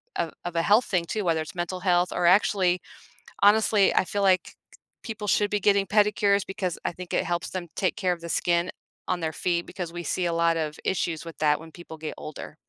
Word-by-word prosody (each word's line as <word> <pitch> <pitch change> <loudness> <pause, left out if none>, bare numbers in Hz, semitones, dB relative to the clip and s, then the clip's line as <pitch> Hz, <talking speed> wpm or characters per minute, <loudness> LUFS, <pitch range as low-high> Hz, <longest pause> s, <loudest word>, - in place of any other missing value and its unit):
of - - -1
of 175 -1 -4
a 165 - +2
health 210 +7 +4
thing 180 -3 0
too, 210 +5 -3
whether 165 -2 +1
it's 155 - -8
mental 175 +1 -3
health 180 -1 +2
or 175 - 0
actually 185 -1 +3 0.6
honestly, 205 -1 +5
I - - +3
feel 200 +2 -2
like 185 -2 +4
k - - -12 0.5
people 220 -3 -6
should 205 +1 +2
be 210 - 0
getting 200 0 +3
pedicures 205 -1 +3
because 185 -3 -3
I - - -1
think 180 +1 -9
it - - +1
helps 175 0 -2
them 180 -2 -5
take 185 - 0
care 185 -5 +1
of 170 - -15
the 170 - -6
skin 170 +1 +1 0.4
on 180 -1 -1
their 160 -1 -2
feet, 175 -1 -1
because 180 -3 -6
we 175 0 -5
see 175 +2 -1
a 170 - 0
lot 165 0 +2
of 155 -1 -3
issues 170 -4 -1
with 165 - -8
that 150 -1 +2
when 160 0 -11
people 160 -2 -11
get 155 0 -5
older. 155 0 -8
180 Hz, 230 wpm, -26 LUFS, 170-200 Hz, 0.6 s, honestly